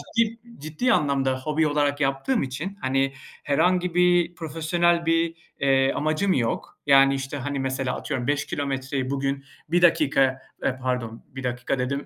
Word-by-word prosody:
ciddi 230 0 +2 0.2
ciddi 155 - 0
anlamda 135 -4 +1
hobi 155 +3 +1
olarak 145 -1 +1
yaptığım 135 - +1
için, 155 +10 -5
hani, 135 +1 +1 0.3
herhangi 180 +4 +1
bir 175 -1 +3
profesyonel 170 +2 0
bir, 165 0 +1 0.2
eee, 135 -1 +3
amacım 155 +6 +1
yok. 115 -3 -1
Yani, 135 0 +6
işte, 135 +1 -4
hani, 140 +1 -3
mesela, 130 -1 -2
atıyorum, 125 0 -4
5 145 0 0
kilometreyi 135 -1 -3
bugün 140 0 -2 0.3
1 175 +1 +2
dakika, 135 -6 +3 0.2
e, 130 - +1
pardon, 125 -3 -3
1 135 0 -8
dakika 125 +1 -2
dedim, 140 +3 -2
140 Hz, 150 wpm, -24 LUFS, 135-165 Hz, 0.3 s, Yani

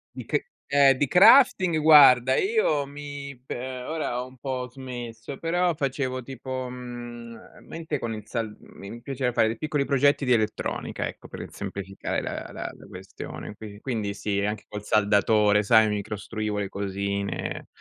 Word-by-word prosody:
Di - - -7
che - - -1 0.2
Eh, 140 -2 +5
di 145 - +1
crafting, 185 - +6
guarda, 135 -5 +7
io 385 - +2
mi 140 -2 -8
pe - - -5 0.3
ora 140 -4 -2
ho 125 - -6
un 130 0 -16
po' 130 -1 -4
smesso, 125 -1 -8
però 175 +1 +1
facevo 135 -2 -2
tipo, 130 0 -5
mhmm, 120 -2 -9
mente 160 -2 -4
con 115 -1 -3
il 105 -1 -8
sal 115 -3 -3
mi 105 +4 -11
piaceva 130 0 -2
fare 110 - +3
dei 115 - -3
piccoli 150 0 -1
progetti 140 +1 +3
di 125 - +4
elettronica, 110 -2 -1
ecco, - - -11
per - - -7
semplificare 95 0 -4
la - - -5
la - - -5
la - - -15
questione, 95 +2 -9
qui 105 -1 -10
quindi 110 -6 -3
sì, 100 -1 -2
anche 105 +1 -3
col 105 -1 -7
saldatore, 105 0 +3
sai, 110 +1 +5
mi 105 -1 -1
costruivo 105 0 -4
le 100 - -2
cosine, 100 0 -3
125 Hz, 160 wpm, -26 LUFS, 105-140 Hz, 0.3 s, guarda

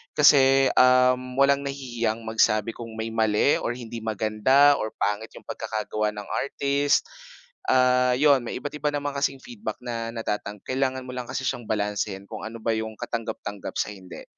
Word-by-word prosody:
kasi, 135 -2 +6
um, 125 0 +4
walang 140 0 +4
nahihiyang 120 -5 -3
magsabi 110 0 +2
kung 115 -1 -7
may 110 0 -3
mali, 110 +4 +3
or - - -2
hindi 120 -1 -7
maganda, 110 +7 +4
or 110 - -3
pangit 105 +2 -2
yung - - -12
pagkakagawa 105 0 -2
ng 105 -1 -6 0.2
artist. 140 +1 +1 0.7
Ah, 125 0 +4
'yon 140 +1 +5
may - - -5
iba't-iba 150 0 -4
naman 145 0 -2
kasing 140 -1 -1
feedback 235 -3 -6
na 115 -1 -4
natatang 105 -2 -4
kailangan 130 0 -1
mo - - -6
lang 125 -1 -5
kasi 135 - -3
siyang 120 - -3
balansehin 105 -2 -2
kung - - -8
ano 115 +1 -8
ba 115 - +1
yung 110 0 -4
katanggap-tanggap 115 -4 -5
sa - - -1
hindi. 95 -2 -11
120 Hz, 165 wpm, -25 LUFS, 110-135 Hz, 0.7 s, kasi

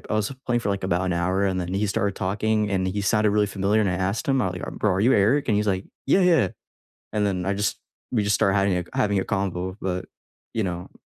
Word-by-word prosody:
I - - +1
was 110 +3 0
playing 120 -1 +2
for, 105 - -3
like, 100 -1 -2
about 90 0 +1
an 90 - 0
hour 90 +3 +1
and 95 -1 0
then 90 0 -4
he 105 +2 +1
started 100 -1 -1
talking 105 +2 0
and 95 -1 0
he 100 +2 -2
sounded 105 0 +3
really 105 0 +2
familiar 100 +2 +1
and 105 - +2
I - - -1
asked 95 - -1
him, 135 -2 +3
I'm 95 - 0
like 90 - -6 0.2
"Bro, 105 - +2
are 95 - 0
you 120 +6 +4
Eric," 115 +9 +3
And 105 - +3
he's 105 - +1
like, 95 0 0 0.2
"Yeah, 185 - +4
yeah," 165 - +4 0.6
and 105 -1 +1
then 90 -3 -1
I 100 - +1
just 105 +1 -1 0.3
we 110 - +2
just 100 -1 +2
started 100 0 +2
hiding 90 -3 +1
a - - -8
having 100 -2 +2
a - - -3
convo, 95 -1 -2
but, 90 -1 -3 0.5
you 110 - +1
know 90 -1 -5
100 Hz, 260 wpm, -24 LUFS, 95-105 Hz, 0.6 s, you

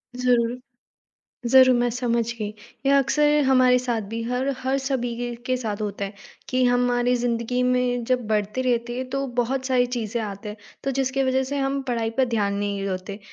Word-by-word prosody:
ज़रूर। 245 -1 +2 0.9
ज़रूर 260 -1 +7
मैं 240 0 +2
समझ 235 -1 0
गई। 210 -1 -2 0.4
ये 275 - +4
अक्सर 285 +2 +3 0.2
हमारे 255 -1 +5
साथ 245 -2 -1
भी 230 0 -3
हर 250 +3 -1
हर 265 +1 0
सभी 260 -3 -2 0.3
के 255 0 +1
साथ 215 -4 -4
होता 200 -1 -3
है 195 - -6 0.4
कि 255 0 +1
हमारी 245 0 +2
ज़िंदगी 240 +1 -1
में 250 -1 +1
जब 250 -3 +1
बढ़ते 210 +3 0
रहते 240 -1 0
हैं 255 0 -4
तो 275 0 -1
बहुत 260 +2 -1
सारी 250 -2 +3
चीज़ें 225 0 -2
आते 205 0 -6
हैं। 210 - -6 0.3
तो 275 - 0
जिसके 270 0 +1
वज़ह 260 0 +2
से 285 - -1
हम 275 0 0
पढ़ाई 230 -2 0
पर 260 - +5
ध्यान 200 -2 +1
नहीं 200 -1 -2
होते। 190 +2 -5
245 Hz, 185 wpm, -24 LUFS, 225-260 Hz, 0.9 s, ज़रूर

